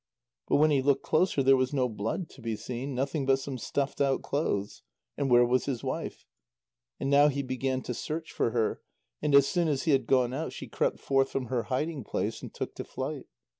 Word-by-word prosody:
But - - +2
when 155 +1 +5
he 140 -2 +3
looked 140 0 +2
closer, 155 -4 +2
there 135 +1 +6
was 130 +1 0
no 130 -2 +2
blood 120 - -3
to 135 - -14
be 115 -1 -2
seen, 130 +5 -5
nothing 135 +2 -1
but 135 0 +5
some 135 -1 -6
stuffed 140 +5 -2
out 135 -1 +2
clothes. 105 -9 -2 0.3
And 140 -2 -1
where 120 0 +6
was 125 +1 +1
his 130 -4 -3
wife? - - -4 0.7
And - - -2
now 140 +1 +6
he 140 -1 -1
began 130 0 -2
to 125 - -3
search 160 +6 -4
for - - 0
her, 115 -2 0 0.4
and 150 -2 +2
as 140 -1 +8
soon 175 -2 +1
as 140 -4 0
he 160 - +2
had 135 -4 +2
gone 125 -2 +3
out, 155 +4 -3
she - - -7
crept - - -1
forth 135 -1 +2
from 130 -4 -3
her 120 -2 0
hiding 145 +1 -1
place, - - -3
and - - -8
took - - -5
to - - -4
flight. - - -5
135 Hz, 220 wpm, -29 LUFS, 125-145 Hz, 0.7 s, as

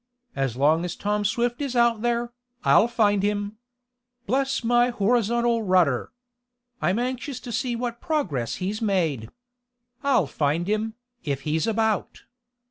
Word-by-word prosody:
As 135 -3 -1
long 155 +5 +3
as 180 - -3
Tom 210 0 -1
Swift 240 +4 0
is 275 -3 -3
out 235 -2 +3
there, 240 0 -1 0.3
I'll 225 - +5
find 210 -4 +2
him. 205 +1 -1 0.7
Bless 270 +3 0
my 240 +1 +3
horizontal 235 +1 +1
rudder! 180 - +2 0.7
I'm 185 +4 +1
anxious 255 +2 -3
to 240 - -7
see 240 +2 -1
what 235 0 -4
progress 200 - -1
he's 200 +4 -3
made. 165 - 0 0.7
I'll 275 - +3
find 150 +5 -1
him, 215 +1 -1 0.3
if 140 -4 -2
he's 155 +4 -1
about!" 220 -1 -1
215 Hz, 135 wpm, -25 LUFS, 180-240 Hz, 0.7 s, I'll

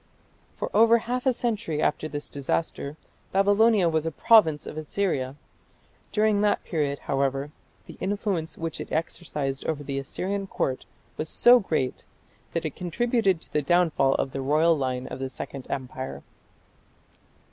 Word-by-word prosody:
For - - -4
over 230 +2 +7
half 245 +3 -2
a - - +6
century 225 -10 -2
after 155 - 0
this 145 -1 -5
disaster 140 +1 -3 0.3
Babylonia 205 0 +4
was 160 -1 0
a - - -1
province 160 -5 +4
of - - -7
Assyria. 155 -5 -1 0.8
During 210 -1 +2
that 210 0 +2
period, 145 -4 -1
however, 135 +1 0 0.3
the - - -12
influence 195 -4 -2
which 165 0 -4
it - - -8
exercised 150 -4 -2
over 150 -2 -2
the 140 -1 -3
Assyrian 195 +8 -3
Court 130 -7 -2 0.3
was 155 - -3
so 245 +1 +6
great 155 - -2 0.5
that 165 -1 -1
it 155 - -3
contributed 195 0 +1
to - - -20
the 150 - +2
downfall 155 -4 +3
of 135 - -1
the 135 - -4
royal 155 +5 +3
line 130 -3 -2
of 130 - -7
the 135 0 -3
Second 130 +1 -8
Empire. 130 0 -5
160 Hz, 150 wpm, -26 LUFS, 140-200 Hz, 0.8 s, over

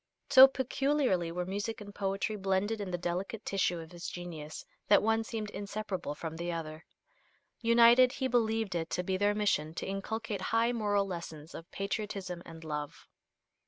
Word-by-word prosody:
So 265 0 +11
peculiarly 265 - 0
were 180 +1 -3
music 205 +4 -3
and 205 -1 -10
poetry 195 +2 -2
blended 200 +2 0
in 200 - -4
the 175 - -2
delicate 185 +5 -3
tissue 190 -3 +1
of 160 -1 -9
his 175 -1 -6
genius 160 -4 -7 0.2
that 205 - +6
one 225 +1 +2
seemed 220 -2 -5
inseparable 200 -7 -4
from 160 +1 -6
the 170 +1 -3
other. 160 -1 -5 0.8
United, 235 +2 +6
he 265 -2 -1
believed 225 -4 +1
it 165 -2 -2
to 180 - -1
be 190 +1 -1
their 205 +2 +2
mission 165 -7 0
to - - -4
inculcate 200 +1 -3
high 230 +4 +2
moral 205 -4 +1
lessons 170 -4 -7
of 165 - -9
patriotism 195 -3 -4
and 165 -1 -10
love. 150 -2 -5
195 Hz, 165 wpm, -31 LUFS, 175-220 Hz, 0.8 s, So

